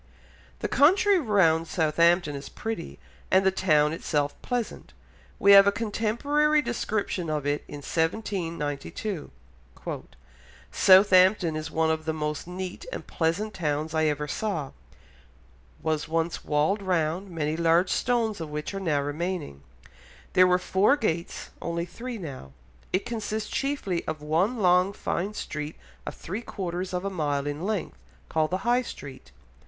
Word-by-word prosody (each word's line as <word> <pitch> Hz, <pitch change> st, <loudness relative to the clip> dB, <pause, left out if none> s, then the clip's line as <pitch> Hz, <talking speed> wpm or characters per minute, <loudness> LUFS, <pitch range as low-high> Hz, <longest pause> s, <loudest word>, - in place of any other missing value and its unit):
The -, -, 0 dB
country 380 Hz, +7 st, +4 dB
round 175 Hz, -, +3 dB
Southampton 165 Hz, 0 st, +2 dB
is 140 Hz, -, -7 dB
pretty, 220 Hz, -6 st, -5 dB, 0.3 s
and 190 Hz, 0 st, +4 dB
the 190 Hz, -, +5 dB
town 155 Hz, -5 st, +3 dB
itself 145 Hz, -3 st, -1 dB
pleasant; 245 Hz, -3 st, -4 dB, 0.4 s
we 200 Hz, -, +5 dB
have 200 Hz, 0 st, +9 dB
a -, -, +5 dB
contemporary 235 Hz, +8 st, +1 dB
description 205 Hz, -7 st, -2 dB
of 150 Hz, -2 st, -2 dB
it 145 Hz, +1 st, 0 dB
in 145 Hz, -1 st, -9 dB
1792. 165 Hz, -1 st, -2 dB, 1.4 s
"Southampton 185 Hz, -2 st, +5 dB
is 155 Hz, 0 st, -4 dB
one 160 Hz, 0 st, +1 dB
of 160 Hz, 0 st, -2 dB
the 160 Hz, 0 st, -1 dB
most 150 Hz, +1 st, -3 dB
neat 180 Hz, 0 st, -6 dB
and -, -, -6 dB
pleasant 180 Hz, +6 st, -1 dB
towns 155 Hz, -1 st, -2 dB
I 160 Hz, 0 st, +2 dB
ever 150 Hz, -1 st, 0 dB
saw... 160 Hz, -6 st, -3 dB, 1.1 s
was 155 Hz, -1 st, -1 dB
once 165 Hz, +1 st, -1 dB
walled 155 Hz, +8 st, +1 dB
round, 180 Hz, 0 st, -1 dB
many 155 Hz, -3 st, -2 dB
large 170 Hz, +2 st, +3 dB
stones 230 Hz, -6 st, 0 dB
of 160 Hz, -, -5 dB
which 150 Hz, +5 st, -4 dB
are 195 Hz, -, -3 dB
now 155 Hz, -7 st, +1 dB
remaining. 150 Hz, -, -4 dB, 0.7 s
There 185 Hz, 0 st, +6 dB
were 180 Hz, 0 st, +4 dB
four 190 Hz, +9 st, +3 dB
gates, 170 Hz, -, -3 dB
only 170 Hz, 0 st, -2 dB
three 235 Hz, +7 st, -7 dB
now. 135 Hz, -, -8 dB, 0.4 s
It 185 Hz, -, 0 dB
consists 215 Hz, -2 st, -3 dB
chiefly 270 Hz, -11 st, -1 dB
of 155 Hz, -1 st, -3 dB
one 175 Hz, +11 st, +1 dB
long 180 Hz, -1 st, +3 dB
fine 200 Hz, +2 st, -3 dB
street 150 Hz, -3 st, -5 dB, 0.3 s
of -, -, -4 dB
three 200 Hz, +7 st, -5 dB
quarters 185 Hz, -4 st, -4 dB
of 180 Hz, +1 st, -3 dB
a 195 Hz, -, -2 dB
mile 145 Hz, -5 st, -1 dB
in 145 Hz, +3 st, -4 dB
length, 215 Hz, -4 st, -3 dB, 0.3 s
called 155 Hz, -1 st, +1 dB
the 185 Hz, +4 st, -3 dB
High 245 Hz, +1 st, +3 dB
Street.... 135 Hz, -, -10 dB
175 Hz, 145 wpm, -26 LUFS, 155-205 Hz, 1.4 s, have